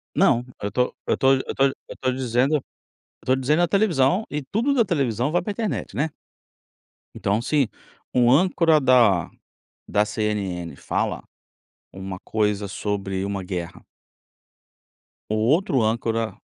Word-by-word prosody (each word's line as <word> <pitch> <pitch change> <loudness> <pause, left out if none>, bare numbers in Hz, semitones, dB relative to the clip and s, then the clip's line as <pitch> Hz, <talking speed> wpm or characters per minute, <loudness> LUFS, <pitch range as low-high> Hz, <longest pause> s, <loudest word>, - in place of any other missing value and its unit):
Não, 120 +1 +3 0.2
eu 100 0 -3
tô 125 +3 0
eu - - +1
tô 135 0 +4
eu 130 - -4
tô 135 - +2
eu 135 - -4
tô 130 -1 0
dizendo 130 +3 +1
eu 145 - 0 0.6
estou 130 - +2
dizendo 150 +6 +2
a 175 - +3
televisão 185 -2 +2
e 150 0 -3
tudo 235 - 0
da 240 -4 +4
televisão 135 - 0
vai 175 - +2
pra 210 - -4
internet, 220 -1 -3
né? 155 +3 0 1.1
Então, 100 +2 0
assim 135 +1 +1 0.5
um 125 -1 +4
âncora 165 0 +4
da 120 - +4 0.6
da 105 +1 +2
CNN 105 -6 -3
fala - - -2 0.7
uma 95 -1 -7
coisa 105 -1 -1
sobre 95 -2 -3
uma 100 -1 -3
guerra. 90 -2 -6 1.4
O 110 - 0
outro 130 - +2
âncora 115 -1 -1
125 Hz, 140 wpm, -23 LUFS, 105-150 Hz, 1.4 s, tô